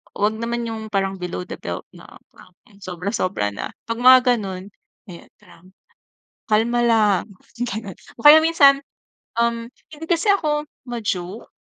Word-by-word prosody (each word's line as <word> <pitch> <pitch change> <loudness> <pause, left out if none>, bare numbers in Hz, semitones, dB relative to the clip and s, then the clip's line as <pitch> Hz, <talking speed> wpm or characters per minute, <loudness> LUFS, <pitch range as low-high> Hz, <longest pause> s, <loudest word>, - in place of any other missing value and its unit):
wag 210 +2 0
naman 235 +1 -3
yung 220 -1 -6
parang 195 -1 -1
below 180 0 -4
the - - -7
belt - - -6
na - - -14 0.8
sobra-sobra 185 - -2
na. - - -6 0.2
'Pag 230 - -2
mga 255 +1 +9 0.2
gano'n, 190 -4 -6 0.5
eh, 170 - -12
parang 185 +3 -20 0.8
kalma 230 +3 +2
lang, 215 -5 +3 0.4
ganun. 205 -3 -6 0.2
O 230 - -12
kaya 300 +2 +11
minsan, 280 -4 +5 0.6
um, 235 0 0 0.3
hindi 305 +2 -9
kasi 345 +4 +1
ako 300 -6 0 0.2
ma-joke. 210 -4 -4
225 Hz, 135 wpm, -21 LUFS, 195-245 Hz, 0.8 s, kaya